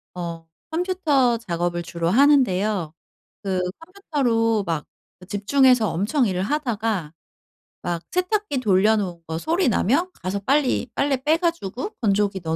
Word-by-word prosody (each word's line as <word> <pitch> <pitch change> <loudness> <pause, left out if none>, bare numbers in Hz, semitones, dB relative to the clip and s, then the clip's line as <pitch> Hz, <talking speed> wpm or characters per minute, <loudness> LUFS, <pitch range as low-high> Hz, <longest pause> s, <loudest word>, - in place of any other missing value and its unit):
어 170 -2 -6 0.2
컴퓨터 320 -8 +1
작업을 175 -4 -2
주로 170 0 -2
하는데요. 210 - +3 0.5
그 190 -2 -1 0.2
컴퓨터로 265 - 0
막 165 -4 -2 0.4
집중해서 240 +2 +3
엄청 220 - +1
일을 185 -1 -1
하다가 220 - -2 0.7
막 175 -1 -2
세탁기 365 -2 0
돌려 210 0 +3
놓은 180 -5 -3
거 160 0 -3
소리 330 - +1
나면 290 - +1
가서 190 +2 -2
빨리 265 +3 +1
빨래 275 -1 +1
빼 310 +3 +3
가지고 335 - -2
건조기 200 -3 +1
넣어 160 -1 -1
220 Hz, 275 characters per minute, -23 LUFS, 185-285 Hz, 0.7 s, 하는데요